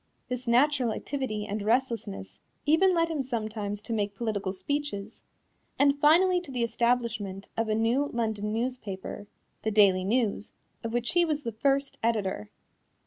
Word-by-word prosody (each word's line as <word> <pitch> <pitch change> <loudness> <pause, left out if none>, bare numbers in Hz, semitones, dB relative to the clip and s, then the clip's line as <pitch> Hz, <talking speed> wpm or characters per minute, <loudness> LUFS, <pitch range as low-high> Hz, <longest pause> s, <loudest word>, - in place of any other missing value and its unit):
This 250 -1 -4
natural 250 -1 +3
activity 255 -7 -3
and 205 +1 -3
restlessness 220 - -1 0.3
even 355 +5 +4
led 335 0 +3
him 315 -4 -1
sometimes 215 -4 -3
to 230 - -4
make 205 -2 -1
political 205 -4 -2
speeches, 220 -1 -4 0.6
and 280 0 +3
finally 355 +5 +5
to 350 - -12
the 250 -3 -1
establishment 230 -4 -1
of 225 -1 -1
a 215 - +2
new 235 +6 +2
London 220 -4 -2
newspaper 220 -4 -4 0.3
the 220 - 0
Daily 200 -3 +5
News 215 0 0 0.3
of 230 - -3
which 240 0 -1
he 350 0 +4
was 305 -3 -1
the 230 - -2
first 275 +5 0
editor. 205 - -1
230 Hz, 150 wpm, -28 LUFS, 210-275 Hz, 0.6 s, finally